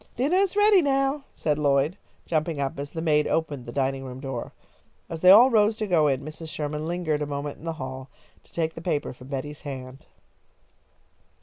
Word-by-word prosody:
"Dinner 285 Hz, +9 st, +2 dB
is 390 Hz, 0 st, +2 dB
ready 415 Hz, -2 st, +6 dB
now," 275 Hz, -1 st, +1 dB
said 150 Hz, -1 st, -1 dB
Lloyd, 145 Hz, +3 st, +2 dB, 0.3 s
jumping 155 Hz, -1 st, -1 dB
up 140 Hz, 0 st, -2 dB
as 140 Hz, 0 st, -4 dB
the 160 Hz, +1 st, -5 dB
maid 150 Hz, -2 st, +3 dB
opened 145 Hz, -6 st, -2 dB
the -, -, -5 dB
dining 135 Hz, 0 st, -1 dB
room 130 Hz, -1 st, -8 dB
door. 135 Hz, -3 st, -5 dB, 0.6 s
As 165 Hz, -1 st, -6 dB
they 180 Hz, -, +7 dB
all 235 Hz, +7 st, +9 dB
rose 215 Hz, -1 st, +3 dB
to 215 Hz, -, -2 dB
go 170 Hz, -6 st, +3 dB
in, 135 Hz, -2 st, +1 dB
Mrs. 155 Hz, +2 st, -8 dB
Sherman 150 Hz, 0 st, -4 dB
lingered 165 Hz, -3 st, -1 dB
a 150 Hz, -, -1 dB
moment 145 Hz, 0 st, -4 dB
in 160 Hz, -, -12 dB
the 165 Hz, -, -2 dB
hall, 130 Hz, -3 st, -7 dB, 0.3 s
to -, -, -24 dB
take 160 Hz, -1 st, -1 dB
the 165 Hz, -, -8 dB
paper 155 Hz, -6 st, -2 dB
from 125 Hz, 0 st, -14 dB
Betty's 140 Hz, +2 st, -5 dB
hand. 130 Hz, -2 st, -8 dB
150 Hz, 200 wpm, -25 LUFS, 140-180 Hz, 0.6 s, all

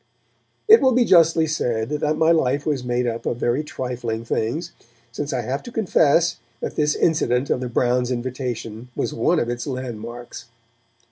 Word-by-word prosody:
It 445 Hz, +1 st, +8 dB
will 260 Hz, -1 st, +4 dB
be 245 Hz, 0 st, +3 dB
justly 165 Hz, -4 st, +5 dB
said 120 Hz, -7 st, -1 dB
that 150 Hz, +1 st, -1 dB
my 160 Hz, +1 st, +4 dB
life 145 Hz, -3 st, +1 dB
was 145 Hz, -5 st, -1 dB
made 125 Hz, 0 st, -1 dB
up 115 Hz, -1 st, -3 dB
of 120 Hz, -, -1 dB
very 120 Hz, +4 st, 0 dB
trifling 120 Hz, -5 st, -4 dB
things, 150 Hz, +10 st, -2 dB, 0.4 s
since 145 Hz, +4 st, -4 dB
I 125 Hz, -, -1 dB
have 130 Hz, +5 st, -3 dB
to 240 Hz, -, -10 dB
confess 170 Hz, -7 st, +2 dB, 0.2 s
that -, -, -5 dB
this 150 Hz, -1 st, +1 dB
incident 135 Hz, -5 st, +1 dB
of -, -, +1 dB
the 125 Hz, -1 st, -4 dB
Browns' 125 Hz, +1 st, +1 dB
invitation 125 Hz, -2 st, -4 dB
was -, -, -2 dB
one 155 Hz, +9 st, +2 dB
of 120 Hz, -, -1 dB
its 120 Hz, 0 st, -4 dB
landmarks. 120 Hz, -2 st, -6 dB
125 Hz, 175 wpm, -22 LUFS, 120-155 Hz, 0.4 s, It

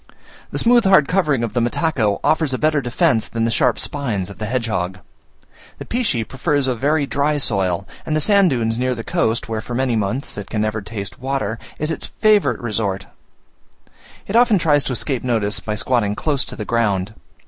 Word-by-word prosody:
The -, -, -4 dB
smooth 240 Hz, -1 st, +4 dB
hard 190 Hz, -7 st, +5 dB
covering 150 Hz, -10 st, +1 dB
of 115 Hz, -, -3 dB
the 120 Hz, -, +1 dB
mataco 120 Hz, -4 st, 0 dB
offers 155 Hz, -4 st, +2 dB
a -, -, -2 dB
better 155 Hz, 0 st, +2 dB
defence 120 Hz, -2 st, +1 dB
than 115 Hz, 0 st, -1 dB
the 115 Hz, -, 0 dB
sharp 120 Hz, 0 st, +2 dB
spines 110 Hz, -10 st, -2 dB
of -, -, -13 dB
the 110 Hz, -, -3 dB
hedgehog. 105 Hz, -7 st, -2 dB, 0.8 s
The -, -, -8 dB
pichy 200 Hz, -, -1 dB
prefers 145 Hz, +1 st, 0 dB
a 130 Hz, -, +1 dB
very 145 Hz, +5 st, +1 dB
dry 145 Hz, +2 st, 0 dB
soil; 95 Hz, -7 st, 0 dB, 0.2 s
and 155 Hz, -, -2 dB
the -, -, +2 dB
sand 200 Hz, +3 st, +4 dB
dunes 115 Hz, -4 st, -1 dB
near 125 Hz, 0 st, 0 dB
the 115 Hz, -, -6 dB
coast, 115 Hz, +1 st, 0 dB
where 110 Hz, -1 st, -3 dB
for 120 Hz, -, -6 dB
many 130 Hz, -1 st, +1 dB
months 110 Hz, +3 st, -2 dB
it 100 Hz, -, -8 dB
can 110 Hz, -2 st, -1 dB
never 110 Hz, 0 st, -2 dB
taste 100 Hz, -1 st, -7 dB
water, 130 Hz, -4 st, -2 dB, 0.2 s
is 155 Hz, +2 st, -1 dB
its -, -, -4 dB
favourite 215 Hz, -2 st, +3 dB
resort: 105 Hz, -4 st, -2 dB, 1.2 s
it 195 Hz, -, -4 dB
often 235 Hz, -3 st, +5 dB
tries 150 Hz, -5 st, +3 dB
to 130 Hz, -, -1 dB
escape 130 Hz, +1 st, -1 dB
notice, 110 Hz, -4 st, 0 dB
by 105 Hz, -, -4 dB
squatting 105 Hz, -2 st, 0 dB
close 145 Hz, 0 st, -1 dB
to -, -, -6 dB
the 105 Hz, -, -5 dB
ground. 105 Hz, -4 st, 0 dB
120 Hz, 195 wpm, -20 LUFS, 110-145 Hz, 1.2 s, hard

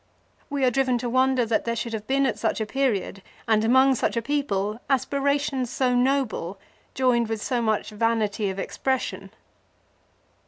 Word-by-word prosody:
We 280 Hz, -2 st, 0 dB
are 250 Hz, -, +3 dB
driven 255 Hz, 0 st, +1 dB
to 240 Hz, 0 st, -3 dB
wonder 260 Hz, -1 st, +3 dB
that 225 Hz, 0 st, 0 dB
there 235 Hz, 0 st, -1 dB
should 230 Hz, 0 st, -4 dB
have 215 Hz, -1 st, -5 dB
been 275 Hz, +1 st, +2 dB
at 265 Hz, -, -1 dB
such 225 Hz, -, 0 dB
a 220 Hz, -, -1 dB
period, 215 Hz, -6 st, -1 dB, 0.3 s
and 220 Hz, -1 st, +3 dB
among 260 Hz, +4 st, +5 dB
such 240 Hz, -, -1 dB
a -, -, +1 dB
people, 215 Hz, -7 st, -1 dB
aspirations 275 Hz, -1 st, 0 dB
so 255 Hz, 0 st, +1 dB
noble 245 Hz, -8 st, 0 dB, 0.4 s
joined 240 Hz, -3 st, +2 dB
with 225 Hz, -1 st, -2 dB
so 240 Hz, +3 st, -1 dB
much 220 Hz, -1 st, 0 dB
vanity 215 Hz, -2 st, 0 dB
of 190 Hz, -, -5 dB
expression. 260 Hz, +6 st, -2 dB
245 Hz, 165 wpm, -25 LUFS, 220-265 Hz, 0.4 s, among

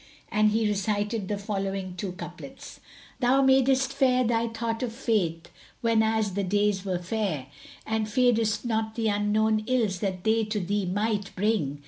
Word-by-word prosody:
And 215 Hz, 0 st, +4 dB
he 220 Hz, +1 st, +1 dB
recited 205 Hz, 0 st, -1 dB
the 205 Hz, -, -2 dB
following 195 Hz, -2 st, -3 dB
two 185 Hz, 0 st, -4 dB
couplets,[FN#171] -, -, -10 dB, 0.4 s
"Thou 260 Hz, +1 st, +4 dB
madest 265 Hz, 0 st, +3 dB
fair 255 Hz, -2 st, +3 dB
thy 230 Hz, -1 st, +1 dB
thought 225 Hz, 0 st, -3 dB
of 245 Hz, -3 st, -2 dB
Fate, 180 Hz, -9 st, -1 dB, 0.3 s
whenas 220 Hz, -2 st, +2 dB
the 200 Hz, +1 st, -1 dB
days 205 Hz, 0 st, +1 dB
were 185 Hz, -3 st, -1 dB
fair, 180 Hz, -, -2 dB, 0.4 s
And 220 Hz, -1 st, -1 dB
fearedst 230 Hz, -1 st, +2 dB
not 220 Hz, -1 st, -1 dB
the 225 Hz, -2 st, 0 dB
unknown 215 Hz, +1 st, +1 dB
ills 225 Hz, -8 st, +1 dB
that 185 Hz, -3 st, -3 dB
they 220 Hz, +1 st, +2 dB
to 215 Hz, 0 st, -2 dB
thee 200 Hz, +1 st, -1 dB
might 205 Hz, +1 st, -1 dB
bring. 190 Hz, -9 st, 0 dB
215 Hz, 155 wpm, -27 LUFS, 195-225 Hz, 0.4 s, And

